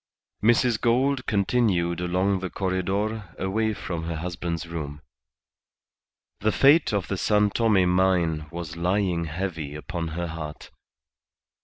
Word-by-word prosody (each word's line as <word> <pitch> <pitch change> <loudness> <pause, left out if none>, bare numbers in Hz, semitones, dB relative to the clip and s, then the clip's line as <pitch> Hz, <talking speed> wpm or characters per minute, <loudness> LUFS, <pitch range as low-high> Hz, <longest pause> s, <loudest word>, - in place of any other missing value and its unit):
Mrs. 120 0 +3
Gould 130 +3 +2
continued 100 -5 +1
along 95 +2 +1
the 90 0 -4
corredor 95 +1 -2
away 110 +3 0
from 85 -4 -4
her 85 0 -3
husband's 85 0 -4
room. 75 -3 -6 1.4
The 110 +2 +2
fate 145 +6 +5
of 100 -4 -1
the 95 - -2
San 105 +1 +2
Tome 105 -6 +3
mine 90 -4 +2
was 85 -1 -6
lying 90 -1 0
heavy 80 -3 -4
upon 85 +2 -4
her 85 +2 -3
heart. 80 -2 -7
90 Hz, 125 wpm, -25 LUFS, 85-105 Hz, 1.4 s, fate